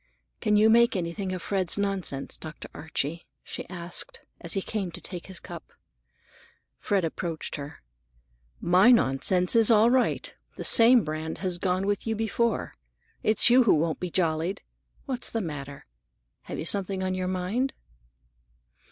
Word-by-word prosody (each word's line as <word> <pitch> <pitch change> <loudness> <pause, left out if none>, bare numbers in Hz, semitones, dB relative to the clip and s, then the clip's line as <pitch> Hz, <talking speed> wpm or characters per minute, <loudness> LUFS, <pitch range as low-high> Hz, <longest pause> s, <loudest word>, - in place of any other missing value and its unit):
"Can 210 - +1
you 215 +1 +5
make 235 +1 +4
anything 185 +2 -3
of 185 -2 -5
Fred's 190 -3 +1
nonsense, 195 -9 -2
Dr. 155 0 -9
Archie?" 160 +1 -4 0.2
she - - -8
asked, 175 -1 -4 0.2
as 170 - -3
he 195 - 0
came 200 -5 -3
to - - -8
take 180 -3 -8
his 190 -2 -8
cup. - - -11 1.1
Fred 195 -4 0
approached 165 0 -4
her. 145 - -9 0.8
"My 185 +6 +4
nonsense 180 - +4
is 225 -1 +6
all 225 +1 +5
right. 255 -1 0 0.2
The - - -6
same 235 0 +6
brand 155 +1 -5
has 180 -1 -1
gone 185 +1 0
with 205 +2 -2
you 225 - 0
before. 225 +1 -1 0.5
It's 215 +2 +5
you 250 0 +6
who 205 - +5
won't 160 +1 -1
be 180 - -4
jollied. 170 +2 -1 0.4
What's 255 -3 -4
the 225 - -2
matter? 145 -6 -7 0.6
You - - -4
have 160 - -4
something 195 -1 0
on 185 0 -1
your 185 0 -2
mind." 190 +9 -1
185 Hz, 155 wpm, -26 LUFS, 170-215 Hz, 1.1 s, is